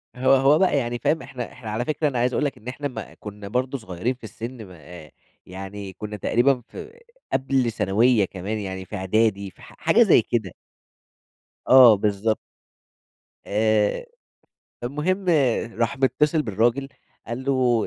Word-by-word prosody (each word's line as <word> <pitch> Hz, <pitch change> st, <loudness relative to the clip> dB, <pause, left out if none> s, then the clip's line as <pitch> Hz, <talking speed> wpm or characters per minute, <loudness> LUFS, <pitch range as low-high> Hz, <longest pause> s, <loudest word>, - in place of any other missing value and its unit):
هو 130 Hz, +2 st, +3 dB
هو 140 Hz, +3 st, +4 dB
بقى 190 Hz, -6 st, +3 dB
يعني 120 Hz, -2 st, -2 dB
فاهم؟ 160 Hz, +5 st, +1 dB
إحنا 130 Hz, -3 st, -7 dB
إحنا 125 Hz, -4 st, -9 dB
على 120 Hz, +3 st, -2 dB
فكرة 150 Hz, 0 st, 0 dB
أنا 130 Hz, -4 st, -1 dB
عايز 125 Hz, +1 st, +1 dB
أقول 150 Hz, -, +1 dB
لك 140 Hz, -, -3 dB
إن 115 Hz, -, -16 dB
إحنا 145 Hz, +3 st, -3 dB
ما 130 Hz, -, -8 dB
كُنّا 105 Hz, -1 st, -9 dB
برضه 130 Hz, +5 st, -1 dB
صغيرين 110 Hz, +1 st, -3 dB
في 125 Hz, -, -32 dB
السِن 115 Hz, +1 st, -8 dB
م -, -, -15 dB
آآ 85 Hz, -2 st, -13 dB, 0.3 s
يعني 95 Hz, +1 st, -8 dB
كُنّا 105 Hz, 0 st, -7 dB
تقريبًا 125 Hz, +5 st, +2 dB
في 465 Hz, +2 st, -11 dB, 0.3 s
قبل 130 Hz, -3 st, +1 dB
ثانوية 110 Hz, +2 st, +2 dB
كمان، 100 Hz, +4 st, -5 dB
يعني 95 Hz, -1 st, -5 dB
في 105 Hz, -, -8 dB
إعدادي 100 Hz, +1 st, 0 dB
في -, -, -22 dB
ح -, -, -14 dB
حاجة -, -, +4 dB
زي -, -, +5 dB
كده. 110 Hz, -7 st, -2 dB, 1.1 s
آه، 125 Hz, -4 st, +9 dB
بالضبط. 105 Hz, +1 st, 0 dB, 1.1 s
آآ، 110 Hz, -, +1 dB, 0.8 s
فالمهم 150 Hz, +10 st, -2 dB, 0.5 s
راح 115 Hz, +3 st, 0 dB
متِّصل 145 Hz, +4 st, +2 dB
بالراجل، 120 Hz, +3 st, 0 dB, 0.4 s
قال 120 Hz, +3 st, -5 dB
له: 125 Hz, -4 st, +2 dB
120 Hz, 160 wpm, -23 LUFS, 105-130 Hz, 1.1 s, آه